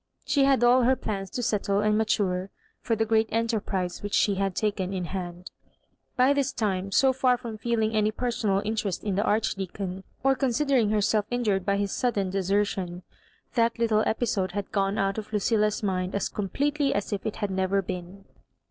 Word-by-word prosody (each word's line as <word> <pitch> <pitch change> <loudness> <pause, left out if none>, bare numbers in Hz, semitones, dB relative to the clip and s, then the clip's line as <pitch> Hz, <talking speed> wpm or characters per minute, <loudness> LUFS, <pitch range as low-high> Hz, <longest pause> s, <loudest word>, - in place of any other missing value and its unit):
She 280 -2 +3
had 270 -3 +3
all 245 +1 +6
her 255 +2 +4
plans 195 -5 -4
to 245 - -4
settle 205 -2 +1
and 210 0 +2
mature 200 -4 0 0.3
for 230 - -1
the 225 +1 +1
great 220 0 +2
enterprise 210 -5 -1
which 205 0 -2
she 205 - +3
had 195 -1 -1
taken 200 -3 -1
in 180 -1 -2
hand^ 180 -1 -6 0.7
%y 255 +3 +5
this 280 -2 0
time, 195 -3 -2
so 265 +5 +4
far 255 -1 +2
from 230 -3 -7
feeling 220 -1 0
any 215 0 +3
personal 215 -4 -1
interest 210 -4 -2
in 205 - -1
the 195 - +1
Archdeacon, 195 -3 -2 0.2
or 270 0 +4
con 270 0 0
sidering 260 -3 +2
herself 210 0 +2
injured 210 -6 0
by 200 0 +2
his 200 -1 -1
sudden 205 -7 0
desertion, 190 -2 -1 0.5
that 230 -1 +2
little 225 -2 +2
episode 205 -6 0
had 205 0 -4
gone 195 0 0
out 195 +2 0
of 215 - -9
Lucilla's 210 0 +1
mind 185 -1 -1
as 200 - -1
completely 285 +8 -1
as 205 +1 -2
if 200 - -3
it 220 - -3
had 205 -2 -3
never 190 +1 +1
been. 185 +2 -7
210 Hz, 185 wpm, -26 LUFS, 195-230 Hz, 0.7 s, all